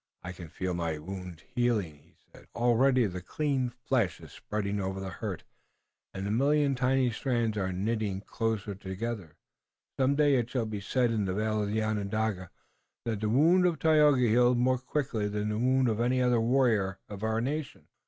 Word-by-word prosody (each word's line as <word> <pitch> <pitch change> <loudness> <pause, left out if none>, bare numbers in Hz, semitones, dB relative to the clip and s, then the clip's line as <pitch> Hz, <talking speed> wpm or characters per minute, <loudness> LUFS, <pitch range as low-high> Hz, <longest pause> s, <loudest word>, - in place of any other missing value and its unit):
"I 90 - -5
can 85 -2 -10
feel 95 +3 -3
my 85 -3 -2
wound 90 0 -8
healing," 110 - 0
he - - -28 0.2
said. - - -16
"Already 125 +1 +3
the 90 -3 -4
clean 135 +4 -1
flesh 120 -7 -1
is - - -13
spreading 105 -1 -3
over 95 0 -3
the 95 -1 -5
hurt 100 -3 -5 0.7
and 95 0 -5
the 100 - -2
million 140 +4 +2
tiny 130 -1 +2
strands 115 -2 -1
are 95 -2 -1
knitting 100 0 -2
closely 110 -2 -2
together. 95 -1 -6 0.6
Some 135 +1 +3
day 145 -2 +4
it 120 -1 -1
shall 125 -3 -1
be 105 -2 -5
said 120 +4 +1
in 110 -3 0
the 95 -1 -2
Vale 110 0 0
of 105 - -2
Onondaga 110 -3 -1 0.6
that 115 -3 -2
the 105 - 0
wound 170 +9 +4
of 170 -3 0
Tayoga 150 -4 +4
healed 120 +2 +4
more 130 +1 +2
quickly 125 -5 -2
than 105 +1 -2
the 105 0 -1
wound 130 +1 +3
of 110 -1 0
any 125 +2 +2
other 125 -2 +3
warrior 115 -6 +2
of 100 -2 -8
our 110 0 0
nation." 145 +4 -4
110 Hz, 185 wpm, -29 LUFS, 100-125 Hz, 0.7 s, day